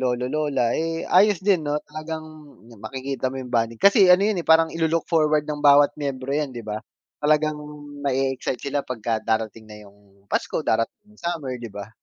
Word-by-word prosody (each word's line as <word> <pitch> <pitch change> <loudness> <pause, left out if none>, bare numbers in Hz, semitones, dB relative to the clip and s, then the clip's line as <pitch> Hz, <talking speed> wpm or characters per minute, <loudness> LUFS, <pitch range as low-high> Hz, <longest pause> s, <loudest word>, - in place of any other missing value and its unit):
lolo 125 -1 -1
lola 135 -5 0
eh, 165 0 -3
ayos 195 0 +4
din 185 -5 +2
no 145 0 -1
talagang 155 +1 -6 0.5
makikita 130 +2 -4
mo 135 - -5
yung 125 - -8
bonding 115 -1 0
kasi 200 0 +6
ano 185 +2 +5
yun 210 -4 0
eh, - - -28
parang 160 0 +5
ilu-look 165 0 -1
forward 155 -2 +2
ng 150 -1 -4
bawat 145 0 +6
miyembro 135 -2 -4
yan 150 -3 -2
di 120 - -6
ba, 105 -1 -5 0.5
talagang 155 0 +2 0.5
ma-excite 135 0 -1
sila 140 0 -1
pagka 115 -2 -2
darating 110 0 -2
na 105 -1 -12
yung 100 0 -26
Pasko, - - -1
darating 115 - -1
yung - - -20
summer, 160 -7 -3
di 115 -4 -9
ba? 100 0 -7
140 Hz, 185 wpm, -23 LUFS, 120-160 Hz, 0.5 s, kasi